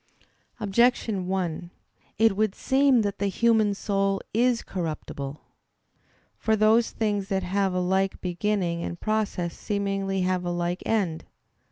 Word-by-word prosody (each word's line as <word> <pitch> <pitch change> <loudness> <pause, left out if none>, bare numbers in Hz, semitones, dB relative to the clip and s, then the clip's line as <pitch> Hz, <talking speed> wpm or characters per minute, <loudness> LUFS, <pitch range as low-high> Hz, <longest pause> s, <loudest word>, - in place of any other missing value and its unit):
Objection 215 -2 +1
1: 180 -2 -2 0.5
It 225 -2 +4
would 215 -1 0
seem 265 -3 +3
that 205 -1 -3
the 200 - +1
human 220 0 +2
soul 195 -1 0
is 240 +1 +2
corruptible. 150 -5 -5 1.0
For 220 - +2
those 220 +2 +4
things 205 -3 -1
that 190 -1 -1
have 190 +1 0
a - - +1
like 190 +2 0
beginning 180 -2 -1
and 170 - -5
process 210 -5 -1
seemingly 195 -2 -2
have 185 0 0
a 175 - -2
like 175 +1 -2
end. 190 -8 0
195 Hz, 135 wpm, -26 LUFS, 180-215 Hz, 1.0 s, It